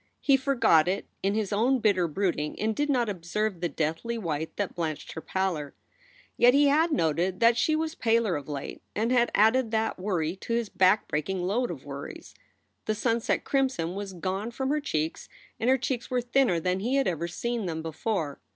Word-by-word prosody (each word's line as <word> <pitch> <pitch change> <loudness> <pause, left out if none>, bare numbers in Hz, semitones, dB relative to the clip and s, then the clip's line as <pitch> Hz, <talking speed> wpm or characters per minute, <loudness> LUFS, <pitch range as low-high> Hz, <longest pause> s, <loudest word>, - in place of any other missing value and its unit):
He 275 - +4
forgot 260 - +3
it 190 +2 -1 0.2
in 200 +1 0
his 215 -2 -1
own 245 +6 +3
bitter 200 -7 +2
brooding 165 -3 -2
and 220 0 0
did 295 0 0
not 245 -4 +2
observe 195 +1 -2
the 175 - 0
deathly 165 +11 -2
white 160 -6 -3
that 205 -2 -2
blanched 160 -4 -4
her 160 - -6
pallor. 175 -7 -2 0.6
Yet 245 +2 +6
he 285 0 +5
had 320 +4 +3
noted 175 - 0
that 230 0 +5
she 310 +6 +2
was 315 0 -1
paler 225 - +1
of 145 0 -6
late 140 -2 -6
and 225 +3 0
had 240 -1 +3
added 225 +3 +4
that 220 -2 -1
worry 180 -4 -1
to 230 - -4
his 230 -2 0
backbreaking 185 -2 +1
load 225 +7 0
of 150 -6 -7
worries. 140 0 -8 0.5
The 215 - 0
sunset 230 +1 0
crimson 260 - 0
was 200 0 -5
gone 190 +5 -3
from 265 +2 -3
her 300 +1 +1
cheeks 160 - -3 0.3
and 235 - +1
her 265 - +5
cheeks 250 -1 -3
were 250 -1 +1
thinner 240 -7 +2
than 180 +3 0
he 240 +7 0
had 275 -1 +2
ever 170 -1 -1
seen 235 +3 -3
them 160 -1 -4
before. 160 -2 -3
205 Hz, 195 wpm, -27 LUFS, 170-240 Hz, 0.6 s, Yet